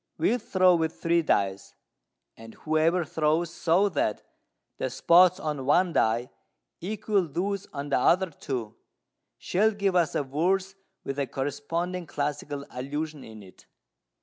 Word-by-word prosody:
We'll 245 +3 +1
throw 185 -4 +3
with 160 -2 -1
three 170 0 +2
dice; 100 -10 -1 0.6
and 115 0 -13
whoever 160 +3 +1
throws 160 +3 0
so 180 +5 +2
that 145 - -1 0.6
the - - -1
spots 180 +2 +5
on 150 -5 -3
one 175 +4 +3
die 115 0 +1 0.5
equal 205 -1 -1
those 195 +6 -3
on 145 0 -5
the 140 - +2
other 185 +6 +3
two 120 -7 -5 0.6
shall 210 +5 +2
give 200 -3 -1
us 170 -3 +2
a - - +1
verse 185 +8 0 0.3
with 135 +1 -4
a 140 - 0
corresponding 165 +7 -3
classical 145 -1 -4
allusion 145 +3 -5
in 110 -2 -11
it." 95 - -18
160 Hz, 140 wpm, -27 LUFS, 140-180 Hz, 0.6 s, spots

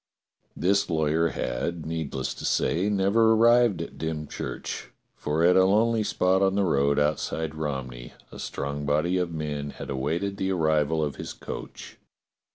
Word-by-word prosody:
This 100 +3 +2
lawyer 80 0 +2
had, 80 +4 -3
needless 80 -5 -3
to - - -10
say, 90 +6 +1
never 105 +3 +3
arrived 115 -4 +4
at - - -11
Dymchurch. 80 -2 -5 0.3
For 75 +2 -1
at 90 +1 +5
a 95 - +6
lonely 110 +3 +3
spot 95 -2 +1
on 95 0 +2
the 100 - +2
road 70 -5 +2
outside 75 +1 0
Romney 65 -6 -5 0.2
a - - -10
strong 70 +1 -4
body 80 +5 +1
of 90 -2 -1
men 75 -2 -4
had 70 - -7
awaited 85 +9 -2
the 95 0 -1
arrival 80 -2 +1
of 75 -2 -3
his - - -6
coach. - - -9
80 Hz, 155 wpm, -26 LUFS, 75-95 Hz, 0.3 s, a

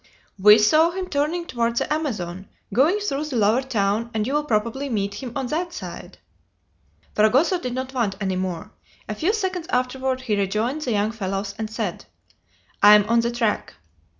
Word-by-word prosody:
"We 210 +2 +8
saw 310 +10 +4
him 370 +1 -4
turning 310 +4 -1
toward 235 -5 -1
the - - 0
Amazon, 195 - -4 0.3
going 295 - +4
through 300 -7 -2
the 300 -4 -5
lower 220 +3 +3
town, 220 -3 -1
and 215 -1 0
you 265 - -2
will 295 0 +1
probably 235 +3 -1
meet 200 -4 -1
him 255 -3 -6
on 270 - -2
that 345 +2 -2
side." - - -8 1.0
Fragoso 265 - +3
did 250 -4 -4
not 260 +1 -4
want 230 -7 0
any 190 -2 -1
more. 185 +2 -4 0.4
A 215 - -3
few 320 - 0
seconds 375 -6 -2
afterward 255 +1 -1
he 230 -5 -1
rejoined 215 +9 -1
the 255 - -2
young 210 +1 +1
fellows, 200 -2 -3
and 220 -1 -3
said: 215 - -4 0.8
"I 210 +1 +9
am 210 0 +3
on 235 0 +4
the 235 0 +1
track." 235 -3 -1
235 Hz, 180 wpm, -23 LUFS, 210-285 Hz, 1.0 s, I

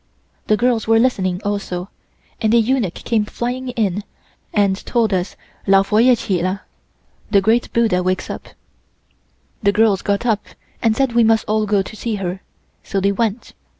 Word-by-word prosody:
The 215 - +3
girls 235 -1 +1
were 225 0 +5
listening 190 -6 +1
also 195 -2 -3 0.5
and 220 -2 +2
a - - +6
eunuch 230 -5 +1
came 225 -3 0
flying 250 +4 -4
in 210 -5 -1 0.5
and 200 -2 +1
told 230 -4 +1
us 180 0 -1 0.3
Lao 195 0 +5
Fo 210 +2 0
Yeh 245 +2 +6
chin 195 -7 -1
la 185 +2 -1 0.7
(The 205 -2 +5
Great 225 +5 +1
Buddha 225 -6 +2
wakes 185 +1 -1
up). - - -7 1.1
The 200 - +3
girls 210 -2 +3
got 200 +3 -1
up 215 -3 +1 0.4
and 225 -2 +2
said 265 -2 +1
we 235 0 +4
must 225 0 +3
all 215 0 +1
go 200 -1 +2
to 215 - -10
see 225 0 -3
her, 190 -1 -4 0.4
so 195 - -2
they 200 +1 +2
went. 220 +2 -2
210 Hz, 175 wpm, -19 LUFS, 195-230 Hz, 1.1 s, a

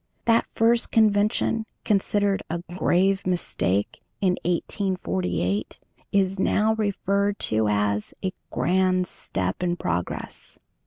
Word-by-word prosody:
That 230 0 +3
first 230 +1 +3
convention, 215 +1 +2 0.2
considered 205 -1 +1
a 170 +1 -3
"grave 190 +1 +2
mistake" 105 - -1 0.2
in 190 -2 +3
1848, 105 - -1 0.3
is 195 -1 +1
now 215 +3 +2
referred 200 -1 0 0.2
to 110 0 +2
as 105 0 0
"a 185 - -1 0.2
grand 185 0 +2
step 95 - -3
in 175 -1 0
progress." 90 - -4
185 Hz, 105 wpm, -25 LUFS, -, 0.3 s, That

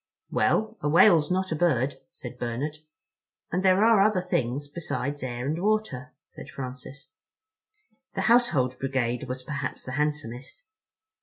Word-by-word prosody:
"Well, 220 0 +1
a 145 - 0
whale's 165 -1 +6
not 185 0 0
a - - +1
bird," 140 -5 +1
said 125 0 -9
Bernard. 125 +6 -3 0.7
"And 180 - 0
there 190 +2 +5
are 225 -3 +6
other 205 -2 +3
things 145 -6 -2
besides 145 -2 -4
air 125 -1 -4
and 155 +5 -2
water," 200 -10 -1
said - - -12
Francis. 135 +1 -8 1.0
The - - -1
Household 145 - +3
Brigade 130 -3 -1
was 130 0 -5
perhaps 140 0 -4
the 125 - -7
handsomest. 150 - -3
145 Hz, 140 wpm, -26 LUFS, 130-180 Hz, 1.0 s, whale's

